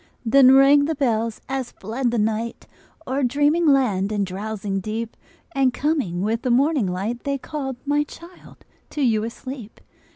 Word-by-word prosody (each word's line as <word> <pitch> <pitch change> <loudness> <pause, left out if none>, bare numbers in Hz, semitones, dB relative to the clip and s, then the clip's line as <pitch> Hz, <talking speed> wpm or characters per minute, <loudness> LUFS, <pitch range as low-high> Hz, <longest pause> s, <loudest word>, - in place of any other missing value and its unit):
Then 260 +2 +6
rang 280 +1 +6
the 320 +1 -1
bells 230 -5 -1
as 265 -2 -4
fled 240 +5 -2
the 235 - -1
night 220 +2 -2 0.4
O'er 265 +2 -1
dreaming 290 +6 +2
land 215 -9 +2
and 205 -2 0
drowsing 195 +1 -4
deep, 220 +3 -4 0.4
And 270 -5 +1
coming 270 - -1
with 225 +2 -1
the 255 - -2
morning 270 -1 +2
light, 200 +7 -3
They 280 0 -1
called, 270 -1 -5
my 290 +1 +2
child, 340 +4 -15 0.2
to 295 - -2
you 220 -4 +2
asleep. 235 0 -8
245 Hz, 160 wpm, -22 LUFS, 215-280 Hz, 0.4 s, Then